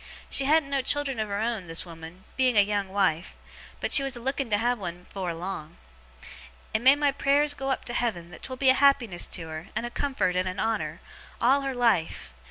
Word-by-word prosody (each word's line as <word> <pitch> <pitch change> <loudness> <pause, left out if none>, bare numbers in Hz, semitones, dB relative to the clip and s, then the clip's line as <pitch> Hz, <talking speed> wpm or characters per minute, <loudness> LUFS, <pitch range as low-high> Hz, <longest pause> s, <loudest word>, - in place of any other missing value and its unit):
She 270 - +1
hadn't 295 -1 +3
no 275 -1 +1
children 275 -2 0
of 215 - -1
her 200 - -2
own, 220 -4 -2
this 165 +2 -2
woman, 165 +2 -11
being 255 -3 +2
a - - +9
young 200 -1 -1
wife; 190 -4 0 0.4
but - - -2
she - - +7
was 270 -2 -2
a - - -7
looking 270 +1 -2
to 205 - +2
have 240 +2 0
one 180 -2 -6
afore 185 -3 -4
long. 170 -2 -6 1.0
And 220 +1 0
may 265 +2 +8
my 290 -1 +2
prayers 285 +1 +3
go 270 -1 -4
up 265 - -1
to 240 - -4
Heaven 180 -9 -2
that - - -11
'twill 260 -1 -6
be 265 0 +3
a - - +8
happiness 260 -9 +3
to 165 -2 -4
her, 160 +3 -7
and - - -1
a 240 - -5
comfort, 210 -12 -1
and 185 0 +1
a 185 +1 -6
honour, 225 +1 -2 0.4
all 265 +4 +4
her 270 -1 -3
life! 230 - 0
230 Hz, 225 wpm, -27 LUFS, 185-270 Hz, 1.0 s, a